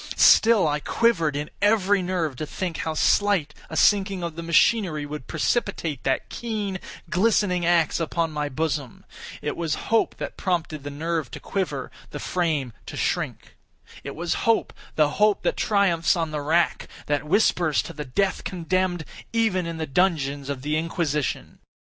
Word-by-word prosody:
Still 220 -6 +6
I 150 0 0
quivered 165 -6 +1
in 150 +1 -4
every 205 -2 +3
nerve 175 -6 -1
to 155 - -4
think 175 -1 -4
how 160 -1 -3
slight 190 -4 +2 0.2
a - - -4
sinking 195 -3 +3
of 170 -2 -4
the 170 - -5
machinery 170 -1 +2
would 145 -3 -7
precipitate 170 - -1
that 135 - 0
keen, 210 -5 -4 0.3
glistening 185 -3 +2
axe 170 -2 +3
upon 165 0 -1
my 150 -1 -2
bosom. 145 -3 -3 0.4
It - - -2
was 165 -3 -1 0.2
hope 225 - +3
that - - -6
prompted 165 -5 -2
the 145 - -5
nerve 160 -1 -2
to - - -8
quiver—the 150 -6 -4
frame 155 -10 -1
to - - -7
shrink. - - -2 0.5
It 140 - -6
was 170 +1 -1 0.2
hope—the 160 -8 +1
hope 210 -1 +4
that - - +1
triumphs 190 -5 +2
on 165 -2 -2
the 150 -1 -3
rack—that 150 -2 0
whispers 175 -4 +2
to - - -8
the 150 - -5
death 185 +9 -1
condemned 180 -1 -1 0.3
even 220 -6 +1
in 165 -1 -5
the 160 - -2
dungeons 145 -3 0
of 135 -2 -4
the 150 +1 0
Inquisition. 155 -3 -2
165 Hz, 155 wpm, -24 LUFS, 150-190 Hz, 0.5 s, Still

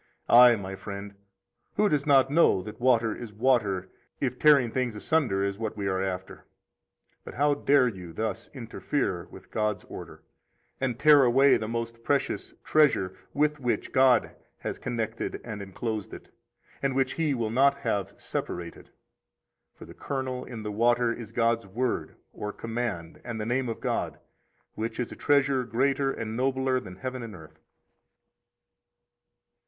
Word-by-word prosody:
16 - - +3
Aye, 120 0 +9
my 95 -2 -6
friend, 100 0 -7 0.6
who 210 - +3
does 150 -4 0
not 135 -1 +5
know 150 - +4
that 105 +2 -9
water 120 -3 +3
is 120 -3 -8
water 105 -5 +1 0.3
if - - -2
tearing 140 -6 +5
things 125 -3 -1
asunder 105 -5 +1
is 100 +1 -2
what 110 -1 -4
we 100 - -3
are 95 -1 0
after? 95 -1 -5 0.8
But - - -10
how 145 +2 +3
dare 140 -2 +3
you 90 -7 -6
thus 110 +3 -4
interfere 115 -6 -3
with - - -14
God's 105 -2 -1
order, - - -10 0.6
and 130 -3 -1
tear 150 +1 +7
away 135 +3 +5
the 110 - -2
most 115 0 -4
precious 140 +2 -1
treasure 140 -12 +3 0.2
with 150 +1 +2
which 125 -3 -1
God 130 -3 +4 0.3
has - - -4
connected 115 -2 -3
and 110 -3 -6
enclosed 110 +2 -4
it, - - -13 0.5
and 135 -1 0
which 130 -1 +2
He 155 -1 0
will 115 -3 -2
not 135 +4 +4
have 105 -7 -2
separated? 85 -1 -5 0.9
For - - -12
the - - -12
kernel 130 -2 -4
in 115 -3 -7
the 105 - -3
water 120 +2 +2
is 115 -2 -8
God's 115 -2 +1
Word 120 +5 -2 0.2
or 105 - -5
command 115 -8 -4
and 115 -2 -5
the 105 - -3
name 125 +2 0
of 115 - -4
God, - - -2 0.6
which 115 +1 -4
is 125 - -2
a - - -7
treasure 140 -2 +2
greater 135 +3 +1
and 110 -3 -5
nobler 130 +1 +1
than 95 -7 -10
heaven 130 +2 -5
and 115 -4 -7
earth. 80 -2 -14
120 Hz, 160 wpm, -27 LUFS, 105-130 Hz, 0.9 s, Aye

